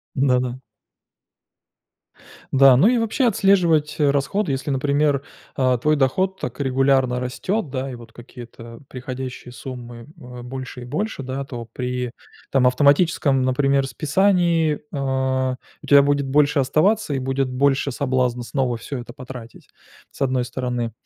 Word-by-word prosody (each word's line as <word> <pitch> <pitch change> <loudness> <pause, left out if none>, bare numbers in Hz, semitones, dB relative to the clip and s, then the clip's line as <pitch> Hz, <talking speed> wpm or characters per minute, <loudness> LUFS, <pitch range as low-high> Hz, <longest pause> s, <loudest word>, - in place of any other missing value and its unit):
Да-да. 125 -2 +1 1.9
Да, 135 -1 +7
ну 170 - +5
и 245 0 +3
вообще 230 +3 0
отслеживать 180 -8 +3
расходы. 145 +6 +1
Если, 135 +2 -3
например, 140 +1 +1 0.3
а, 130 -2 +2
твой 150 +6 +2
доход 185 +8 0
так 125 +2 -6
регулярно 135 -2 +2
растёт, 155 - -2
да, 130 +1 -4
и 125 - -6
вот 115 -1 -14
какие-то 120 -1 -12
приходящие 130 -1 -7
суммы, 120 -1 -9
э, 125 -4 -10
больше 125 0 -7
и - - -8
больше, 200 - -3
да, 130 +2 -4
то 120 -4 -7
при 125 -1 -3 0.4
там 130 -2 +4
автоматическом, 140 +1 +3
например, 135 +1 +1
списании, 170 0 +2
э, 150 - -16 1.0
у - - -12
тебя 140 -1 +7
будет 140 -1 +1
больше 145 +1 +3
оставаться 155 +7 +2
и 135 - -1
будет 135 0 -1
больше 140 +2 +1
соблазна 125 -2 -1
снова 125 -1 -1
всё 130 +4 -6
это 120 0 -9
потратить, 125 -3 -11 0.4
с - - -15
одной 130 -2 +1
стороны. 125 -2 -3
135 Hz, 140 wpm, -22 LUFS, 125-145 Hz, 1.9 s, Да